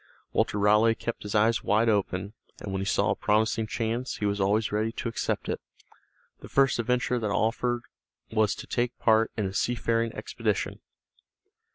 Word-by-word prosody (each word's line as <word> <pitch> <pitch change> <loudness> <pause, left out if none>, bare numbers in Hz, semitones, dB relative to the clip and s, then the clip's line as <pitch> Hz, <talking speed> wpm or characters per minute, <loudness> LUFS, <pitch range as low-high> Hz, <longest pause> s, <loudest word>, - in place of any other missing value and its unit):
Walter - - +1
Raleigh 105 +2 +4
kept 120 - -5
his 105 +1 -5
eyes 110 -1 +3
wide 110 +2 +2
open, 100 -2 0 0.3
and 100 - -6
when 95 - -1
he 95 - -3
saw - - +2
a - - +1
promising 110 +1 +1
chance, 115 +2 -2
he 105 - -3
was 100 0 0
always 105 +3 +1
ready 110 +2 0
to - - -4
accept 115 - -2
it. - - -2 0.8
The - - -11
first 135 -2 +3
adventure 125 +1 +1
that 110 -2 -2
offered 120 +4 0 0.5
was 110 -2 +2
to - - -8
take 120 0 -1
part 110 0 +3
in 105 - 0
a 95 - -3
seafaring 115 +1 0
expedition. - - -2
110 Hz, 175 wpm, -27 LUFS, 105-115 Hz, 0.8 s, Raleigh